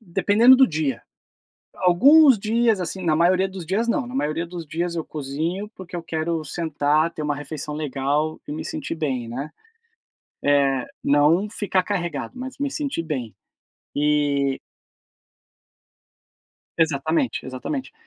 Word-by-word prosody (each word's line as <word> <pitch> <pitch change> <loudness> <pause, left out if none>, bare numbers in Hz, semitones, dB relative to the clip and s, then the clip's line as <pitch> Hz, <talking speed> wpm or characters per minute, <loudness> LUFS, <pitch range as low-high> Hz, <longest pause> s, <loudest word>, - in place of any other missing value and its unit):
dependendo 220 +6 +5
do 265 - +6
dia. 150 -6 -2 0.7
Alguns 260 - +6
dias, 225 -1 +1
assim, 185 +2 -4
na 155 -2 +2
maioria 185 +3 +3
dos 185 -4 -8
dias 220 +6 0
não, 265 0 0
na 250 - -9
maioria 165 - -1
dos 170 -1 -7
dias 170 +3 -3
eu 165 - -3
cozinho, 160 +8 -4
porque 185 -1 -8
eu 170 - -5
quero 160 -1 -2
sentar, 155 0 0
ter 155 - -6
uma 150 -1 -1
refeição 145 +1 -6
legal 150 +1 -1
e - - -5
me 155 - -5
sentir - - -4
bem, 135 -7 -2
né, 135 +6 -5 0.9
eh, 140 -2 +2 0.2
não 155 +8 +3
ficar 200 -3 0
carregado, 175 - -3
mas 260 0 -7
me 285 -1 0
sentir 280 - -2
bem. 130 -9 -4 0.6
E 145 -2 +1 2.2
Exatamente, 160 - 0
exatamente. 130 - -5
165 Hz, 135 wpm, -23 LUFS, 145-195 Hz, 2.2 s, do